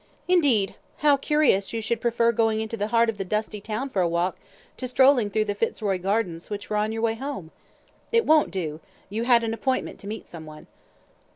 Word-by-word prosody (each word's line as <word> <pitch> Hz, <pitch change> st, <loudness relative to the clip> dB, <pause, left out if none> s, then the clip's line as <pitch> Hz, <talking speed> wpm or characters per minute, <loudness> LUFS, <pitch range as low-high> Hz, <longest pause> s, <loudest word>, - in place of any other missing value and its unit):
"Indeed! 280 Hz, -, +3 dB, 0.3 s
How 290 Hz, -1 st, +7 dB
curious 275 Hz, -9 st, +2 dB
you 230 Hz, -, -1 dB
should 225 Hz, +1 st, -2 dB
prefer 235 Hz, 0 st, +2 dB
going 225 Hz, -1 st, +1 dB
into 220 Hz, +1 st, -3 dB
the 205 Hz, -1 st, -2 dB
heart 230 Hz, +1 st, +3 dB
of 220 Hz, -2 st, -3 dB
the -, -, 0 dB
dusty 210 Hz, +2 st, -3 dB
town 220 Hz, +6 st, -3 dB
for 190 Hz, -, +1 dB
a 175 Hz, -, +2 dB
walk 170 Hz, +2 st, -1 dB, 0.4 s
to 255 Hz, -, -4 dB
strolling 255 Hz, -3 st, +4 dB
through 215 Hz, +1 st, 0 dB
the 205 Hz, -, -1 dB
Fitzroy 205 Hz, -2 st, -1 dB
Gardens, 185 Hz, -3 st, -2 dB
which 205 Hz, -2 st, -6 dB
were 210 Hz, -, +1 dB
on 210 Hz, +1 st, 0 dB
your 225 Hz, 0 st, -3 dB
way 225 Hz, -1 st, +2 dB
home! 225 Hz, -, -6 dB, 0.6 s
It 460 Hz, -1 st, +3 dB
won't 310 Hz, -1 st, +4 dB
do; 160 Hz, -5 st, -4 dB, 0.3 s
you 225 Hz, +3 st, -2 dB
had 240 Hz, -2 st, +5 dB
an 225 Hz, 0 st, -1 dB
appointment 260 Hz, +3 st, -2 dB
to 200 Hz, -, -10 dB
meet 215 Hz, +2 st, -6 dB
some 160 Hz, -2 st, -10 dB
one." 155 Hz, 0 st, -11 dB
220 Hz, 210 wpm, -25 LUFS, 200-235 Hz, 0.6 s, How